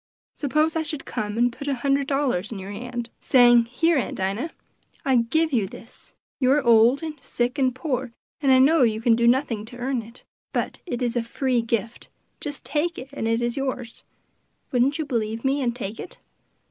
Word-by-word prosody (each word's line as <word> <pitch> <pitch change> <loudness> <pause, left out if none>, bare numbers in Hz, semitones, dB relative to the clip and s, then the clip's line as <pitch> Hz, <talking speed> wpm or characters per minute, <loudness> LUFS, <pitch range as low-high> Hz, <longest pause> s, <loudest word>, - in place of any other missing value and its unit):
Suppose 305 +3 +1
I 325 - +1
should 300 -2 -2
come 210 +1 -3
and 240 0 +2
put 280 - -8
a 280 - +1
hundred 275 +2 +1
dollars 265 -9 0
in 220 - -5
your 195 +1 -7
hand, 240 +2 -5
saying, 240 -2 +6
'Here, 295 +6 +2
Aunt - - -3
Dinah, 200 - -2 0.6
I 265 -2 +4
give 310 +7 +1
you 215 -6 +2
this; 230 +4 -10 0.2
you 255 -2 +3
are 295 -1 +2
old, 235 +4 +5
and 310 -1 -5
sick, 245 +4 -2
and 255 -2 +2
poor, 260 -2 -2 0.3
and 275 -2 +3
I 260 - +7
know 285 +4 +5
you 220 -3 +3
can 230 0 +4
do 235 0 +2
nothing 240 -4 +2
to 245 +2 -11
earn 250 0 -1
it, 230 +3 -12 0.3
but - - -2
it 245 -6 -2
is 240 -1 -1
a 240 - +2
free 245 +1 0
gift, 230 0 -3 0.3
just 290 -2 -5
take 335 +3 -1
it 260 - -8
and 225 - -2
it 230 +1 +1
is 240 0 -1
yours;' 255 -4 -4 0.7
wouldn't 260 +3 +2
you 315 - -2
believe 230 -3 -2
me, 275 +2 +2
and 240 -2 0
take 225 -3 -5
it?" - - -8
245 Hz, 205 wpm, -24 LUFS, 230-275 Hz, 0.7 s, I